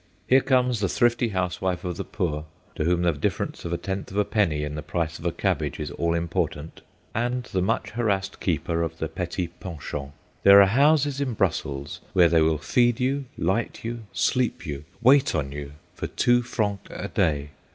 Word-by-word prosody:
Here 130 +1 +5
comes 125 -3 +2
the 100 -2 0
thrifty 120 +3 +2
housewife 90 -2 -1
of 90 -2 -3
the - - -4
poor, 75 -3 -3 0.3
to 75 - -2
whom 90 +1 +2
the 85 - +4
difference 70 - -3
of 85 - -3
a 85 - 0
tenth 95 +2 -4
of 95 - -6
a 105 - +3
penny 85 -9 +1
in 75 0 -4
the 75 - -4
price 80 -1 -3
of 85 - -11
a - - +1
cabbage - - -1
is 75 -2 -4
all 85 +2 0
important, 85 -2 -2 0.3
and 120 +2 -1
the 95 -6 -2
much 110 +5 0
harassed 100 -4 -1
keeper 85 -1 -1
of 80 -1 -3
the 80 - -2
petty 90 +2 -3
pension. 75 -5 -7 0.3
There 100 0 +9
are 100 - +9
houses 140 +5 +3
in 130 -5 -1
Brussels 75 -7 -2
where 85 -2 +6
they 80 -1 +4
will 80 0 +3
feed 120 - +2
you, 135 +2 0
light 95 +7 -1
you, 115 0 -5
sleep 125 -6 0
you, 75 -2 -5 0.2
wait 135 -1 +5
on 70 -3 -1
you, 70 0 -7 0.2
for - - -4
two 120 0 +3
francs 105 -5 -2
a - - -5
day. 75 -1 0
90 Hz, 195 wpm, -25 LUFS, 80-115 Hz, 0.3 s, There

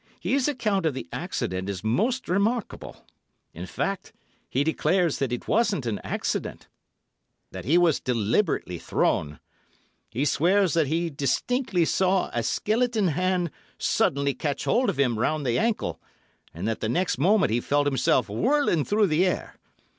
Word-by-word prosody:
His 275 0 +1
account 210 - 0
of 145 - -1
the - - -6
accident 95 +2 -3
is 95 -2 -5
most 225 - 0
remarkable; 205 +5 -2 0.5
in 90 +3 -7
fact, 195 - -3 0.4
he 135 - +1
declares 160 +2 +1
that 135 -3 -1
it 125 - -4
wasn't 205 - +1
an 110 -3 -2
accident, - - -3 0.8
that - - -8
he 155 +8 +4
was 170 -4 +3
deliberately 115 - 0
thrown. 75 -2 0 0.7
He 125 +6 -1
swears 180 +5 +2
that 165 -3 +2
he 165 +3 -1
distinctly 180 - 0
saw 190 +2 +1
a 120 - 0
skeleton 220 - +1
hand 180 +1 0 0.3
suddenly 140 0 +1
catch 145 -1 -3
hold 250 +2 +2
of - - -2
him 120 -5 +2
round 150 +4 0
the 120 -2 +1
ankle, 225 0 -1 0.5
and 85 +6 -5
that 115 - -1
the 110 - -2
next 175 +1 0
moment 190 - +3
he 115 - +2
felt 145 +3 +1
himself 135 -3 +2
whirling 200 - +1
through 210 +5 +2
the 165 -1 +2
air. 180 - -3
160 Hz, 155 wpm, -25 LUFS, 125-200 Hz, 0.8 s, he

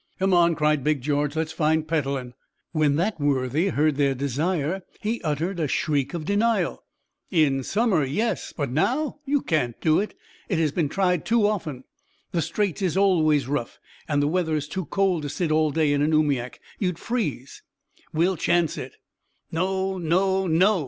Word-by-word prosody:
"Come 190 0 +1
on," 170 -1 +4
cried 150 -2 +1
Big 150 -2 +1
George, 145 +2 0
"let's 160 0 -1
find 155 0 +1
Petellin!" 140 -5 -2 0.4
When 155 -3 +2
that 175 +3 0
worthy 145 +3 +1
heard 155 -5 +1
their 140 -2 +2
desire, 150 +6 -1 0.2
he 225 +3 -2
uttered 165 +4 -2
a 155 - +1
shriek 145 +1 0
of 160 -2 -4
denial. 215 +5 +1 0.5
"In 150 -7 +2
summer, 200 - +1
yes, 180 - -1
but 145 -5 -3
now 265 - 0
you 285 0 +1
can't 130 -8 -1
do 155 -1 +3
it. 210 - -3 0.3
It 185 - +1
has 160 -3 +1
been 155 -2 0
tried 180 -2 +1
too 230 -2 +2
often. 160 -11 -2 0.5
The 170 - 0
Straits 185 +4 -1
is 185 -1 0
always 155 -8 +3
rough, 135 -4 -3 0.3
and 145 -2 +1
the - - +2
weather 160 -1 0
is 150 -1 -2
too 185 +2 -4
cold 190 -1 +1
to 145 - -4
sit 160 +3 -2
all 155 0 +3
day 150 0 +2
in 145 - +1
an 155 +2 +2
oomiak, 140 -5 +1 0.2
you'd 180 -5 -1
freeze." 155 - -3 0.5
"We'll 175 +3 +1
chance 170 0 +1
it." - - -8 0.6
"No, 190 +2 -1
no, 190 +3 +1
NO! 185 +5 +4
160 Hz, 175 wpm, -24 LUFS, 145-190 Hz, 0.6 s, on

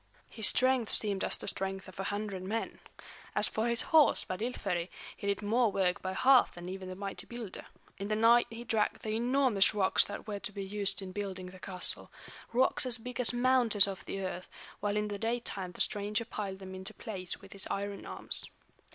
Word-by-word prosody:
His 220 -3 +6
strength 255 -3 +4
seemed 200 -3 +2
as - - 0
the - - -3
strength 190 0 -3
of 185 - -12
a 195 - -2
hundred 205 -2 -3
men. 215 +5 -3 0.6
As - - +5
for 220 +2 -1
his 235 0 +1
horse 310 -2 +6
Svadilföri, 185 -4 -2 0.3
he 200 - -6
did 200 +1 0
more 225 +2 +3
work 185 -2 +1
by 185 0 -3
half 265 +3 +5
than 175 0 -8
even 190 0 -6
the 185 - -6
mighty 195 +1 -5
builder. 235 -5 -7 0.3
In 200 - -3
the 215 - 0
night 230 +2 +5
he 230 +1 -7
dragged 220 -3 0
the 215 - -2
enormous 240 -4 +3
rocks 190 -2 +5
that 205 - -7
were 205 -1 -3
to 235 0 -4
be 200 -1 -5
used 200 0 -1
in 185 - -7
building 190 -2 -4
the 185 - -13
castle, 185 -1 -4 0.4
rocks 255 +2 +3
as 245 -1 +1
big 250 +2 -7
as 250 - +4
mountains 240 -5 +4
of 195 -1 -5
the 195 - -3
earth; 185 -1 -5 0.3
while 205 0 0
in 210 0 0
the 205 -1 -4
daytime 225 -5 -2
the - - -2
stranger 210 +2 0
piled 195 -3 -4
them 190 -1 -9
into 190 0 -6
place 185 -5 -5
with 195 - -13
his 195 - -6
iron 200 0 -3
arms. - - 0
205 Hz, 205 wpm, -32 LUFS, 190-230 Hz, 0.6 s, His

